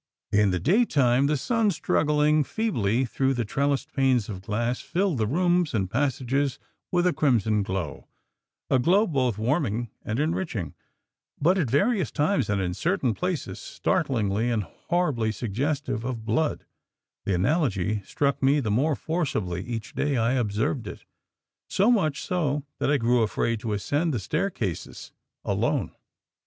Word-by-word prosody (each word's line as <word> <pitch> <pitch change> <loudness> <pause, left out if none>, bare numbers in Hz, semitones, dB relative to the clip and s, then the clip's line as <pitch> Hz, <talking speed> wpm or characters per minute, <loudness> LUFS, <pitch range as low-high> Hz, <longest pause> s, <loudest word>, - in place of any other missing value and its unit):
In 105 -1 +4
the 90 -1 0
day 195 - +3
time 135 - +3
the 150 0 +1
sun 230 - +1
struggling 150 -3 +2
feebly 130 - 0
through 135 +2 0
the 120 -2 -1
trellised 140 +6 -1
panes 130 -6 +2
of 95 -3 -6
glass 115 +5 -1
filled 180 -5 0
the 110 - +1
rooms 175 +2 +1
and 95 -3 -1
passages 135 +1 0 0.3
with 175 0 +2
a 180 - +3
crimson 110 -7 +2
glow 95 -6 -4 0.6
a 130 - +3
glow 185 - +4
both 130 - 0
warming 120 -2 -1
and 110 +4 -2
enriching, 155 - -2 0.7
but 180 +6 +3
at 145 -9 0
various 190 - +2
times 145 - 0
and 100 -1 +1
in 90 -2 -1
certain 160 - 0
places 180 - -3
startlingly 110 -2 0
and 115 -3 0
horribly 140 - -1
suggestive 125 +4 -2
of 120 -3 -4
blood; 155 +6 0 0.6
the 100 - +1
analogy 105 - +1
struck 140 +7 -1
me 140 +2 +4
the 110 -7 -1
more 140 +8 +2
forcibly 125 - -2
each 115 -3 -5
day 145 -2 0
I 115 +2 +2
observed 115 +1 -1
it, - - -9 0.6
so 200 +5 +3
much 155 - +1
so 150 -6 -1 0.2
that - - +1
I 145 - +4
grew 120 -1 +2
afraid 115 +1 0
to 110 -1 -3
ascend 145 - 0
the - - -1
staircases 125 - -3 0.3
ALONE. - - 0
130 Hz, 150 wpm, -26 LUFS, 110-155 Hz, 0.7 s, In